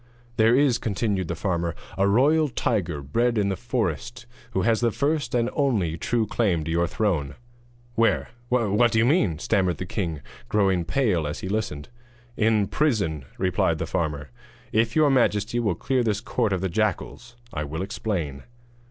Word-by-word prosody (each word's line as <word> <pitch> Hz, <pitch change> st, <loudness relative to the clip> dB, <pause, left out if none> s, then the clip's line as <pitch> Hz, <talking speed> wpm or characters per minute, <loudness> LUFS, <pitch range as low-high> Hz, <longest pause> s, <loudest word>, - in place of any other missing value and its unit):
'There 110 Hz, +2 st, +5 dB
is,' 130 Hz, -4 st, +3 dB
continued 100 Hz, -3 st, -1 dB
the 85 Hz, -, -3 dB
farmer, 85 Hz, -2 st, -1 dB, 0.2 s
'a 100 Hz, +1 st, +2 dB
royal 145 Hz, +9 st, +3 dB
tiger 90 Hz, -, -1 dB
bred 115 Hz, -, +1 dB
in 100 Hz, -1 st, +2 dB
the 95 Hz, -, 0 dB
forest 120 Hz, -, -3 dB, 0.3 s
who 95 Hz, -, +1 dB
has 110 Hz, +1 st, +2 dB
the 120 Hz, -, +3 dB
first 145 Hz, +4 st, -1 dB
and 120 Hz, -1 st, +2 dB
only 110 Hz, -, +1 dB
true 115 Hz, +6 st, 0 dB
claim 95 Hz, -7 st, 0 dB
to 80 Hz, -, -4 dB
your 85 Hz, +1 st, +2 dB
throne.' 80 Hz, -11 st, -1 dB, 0.6 s
'Where? 115 Hz, 0 st, +2 dB, 0.2 s
what 115 Hz, -1 st, +3 dB
do 115 Hz, -, +1 dB
you 115 Hz, -, +4 dB
mean?' 120 Hz, -, +2 dB
stammered 95 Hz, -1 st, +1 dB
the 90 Hz, -, -4 dB
king, 85 Hz, -6 st, -3 dB, 0.3 s
growing 95 Hz, -4 st, +2 dB
pale 100 Hz, -, +1 dB
as 75 Hz, -, -5 dB
he -, -, -4 dB
listened. 100 Hz, -9 st, -3 dB, 0.5 s
'In 110 Hz, -2 st, +2 dB
prison,' 100 Hz, -, 0 dB
replied -, -, +1 dB
the -, -, -2 dB
farmer; 75 Hz, -4 st, -3 dB, 0.4 s
'if 115 Hz, +1 st, +1 dB
your 155 Hz, -2 st, +4 dB
majesty 120 Hz, -3 st, +2 dB
will 105 Hz, -7 st, 0 dB
clear 130 Hz, +7 st, 0 dB
this 105 Hz, -3 st, 0 dB
court 115 Hz, -1 st, -1 dB
of 95 Hz, -2 st, 0 dB
the 95 Hz, -, 0 dB
jackals 110 Hz, +5 st, -2 dB, 0.2 s
I 75 Hz, -, -2 dB
will 80 Hz, +5 st, -4 dB
explain.' 90 Hz, -9 st, -3 dB
105 Hz, 170 wpm, -25 LUFS, 85-120 Hz, 0.6 s, There